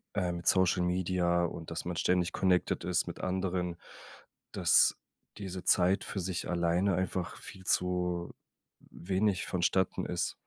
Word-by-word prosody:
äh, 90 Hz, -3 st, 0 dB
mit 85 Hz, 0 st, -7 dB
Social 95 Hz, -1 st, +3 dB
Media 90 Hz, -1 st, +1 dB
und 85 Hz, -1 st, -5 dB
dass 80 Hz, -, -4 dB
man 90 Hz, 0 st, -4 dB
ständig 90 Hz, 0 st, +1 dB
connected 90 Hz, -1 st, +1 dB
ist -, -, 0 dB
mit -, -, -7 dB
Anderen, 90 Hz, -2 st, -2 dB, 0.8 s
dass -, -, +4 dB, 0.4 s
diese 95 Hz, -3 st, -6 dB
Zeit 95 Hz, +2 st, +3 dB
für 100 Hz, -, -4 dB
sich 90 Hz, -1 st, -3 dB
alleine 90 Hz, +2 st, +1 dB
einfach 95 Hz, -1 st, -2 dB
viel 95 Hz, -, -11 dB
zu 90 Hz, -1 st, 0 dB, 0.6 s
wenig 95 Hz, +1 st, -1 dB
vonstatten 95 Hz, +1 st, 0 dB
ist. -, -, -2 dB
90 Hz, 140 wpm, -31 LUFS, 85-95 Hz, 0.8 s, dass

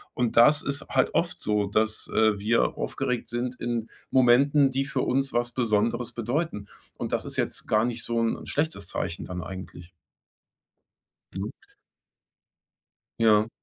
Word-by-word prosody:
Und 120 Hz, -2 st, 0 dB
das 145 Hz, +6 st, +6 dB
ist 140 Hz, 0 st, -2 dB
halt -, -, +2 dB
oft -, -, 0 dB
so, 105 Hz, -1 st, 0 dB
dass, 110 Hz, +2 st, 0 dB
äh, 110 Hz, -2 st, +3 dB
wir 110 Hz, +3 st, +1 dB
aufgeregt 125 Hz, -3 st, -2 dB
sind 120 Hz, +2 st, -2 dB
in 120 Hz, -2 st, -2 dB, 0.2 s
Momenten, 135 Hz, +3 st, +4 dB
die 135 Hz, +1 st, 0 dB
für 135 Hz, -2 st, -2 dB
uns 135 Hz, +2 st, 0 dB
was 120 Hz, 0 st, 0 dB
Besonderes 115 Hz, -1 st, 0 dB
bedeuten. 120 Hz, -2 st, -2 dB, 0.3 s
Und -, -, -4 dB
das -, -, 0 dB
ist -, -, -5 dB
jetzt -, -, -2 dB
gar 110 Hz, +1 st, +3 dB
nicht 120 Hz, -1 st, -3 dB
so 115 Hz, 0 st, -1 dB
'n 115 Hz, 0 st, -1 dB
schlechtes 155 Hz, -, -2 dB
Zeichen 85 Hz, -1 st, -3 dB
dann 90 Hz, -1 st, -5 dB
eigentlich. 95 Hz, -2 st, -9 dB, 1.4 s
Mhm. -, -, -3 dB, 1.7 s
Ja. 110 Hz, -1 st, +4 dB
120 Hz, 145 wpm, -26 LUFS, 110-130 Hz, 1.7 s, das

